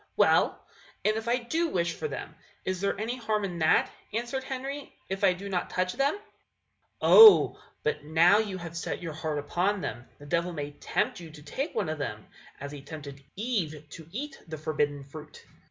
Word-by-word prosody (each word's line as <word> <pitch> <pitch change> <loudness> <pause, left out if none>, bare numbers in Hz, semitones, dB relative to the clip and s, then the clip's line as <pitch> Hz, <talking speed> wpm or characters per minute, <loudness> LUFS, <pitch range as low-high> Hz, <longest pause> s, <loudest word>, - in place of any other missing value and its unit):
"Well, - - +3 0.4
and 215 +1 +3
if 220 +1 -4
I 240 +1 +3
do 315 +8 -1
wish 170 - 0
for - - -4
them, - - -6 0.3
is 185 -1 -2
there 200 0 0
any 230 +4 -2
harm 220 -3 -1
in 175 -3 -5
that," 160 0 +3 0.2
answered 240 +4 -2
Henry, 270 +2 -5 0.2
"if 190 +1 -3
I 190 -2 +6
do 195 +3 -8
not 185 -3 -2
touch 185 0 -1
them?" 275 +3 +2
Lucy. 415 - -13 0.8
"Oh! 445 -2 +9 0.2
but 150 -1 -1
now 165 +6 +5
you 205 -4 -2
have 170 -2 -8
set 170 - -4
your 165 -2 -4
heart 155 -1 -3
upon 180 +8 0
them, 120 -5 -5
the 145 - -13
devil 170 +3 0
may 145 -2 -4
tempt 145 - -1
you 170 -2 -9
to 155 -1 -13
take 270 - -4
one - - 0
of 155 -1 -3
them, 105 -7 -4 0.3
as 140 +1 -6
he 145 -1 -8
tempted 140 -2 -9
Eve 180 - -2
to 160 -2 -10
eat 275 +6 -5
the 160 -1 -6
forbidden 150 -2 -1
fruit. 150 +2 -12
180 Hz, 200 wpm, -28 LUFS, 150-220 Hz, 0.8 s, Oh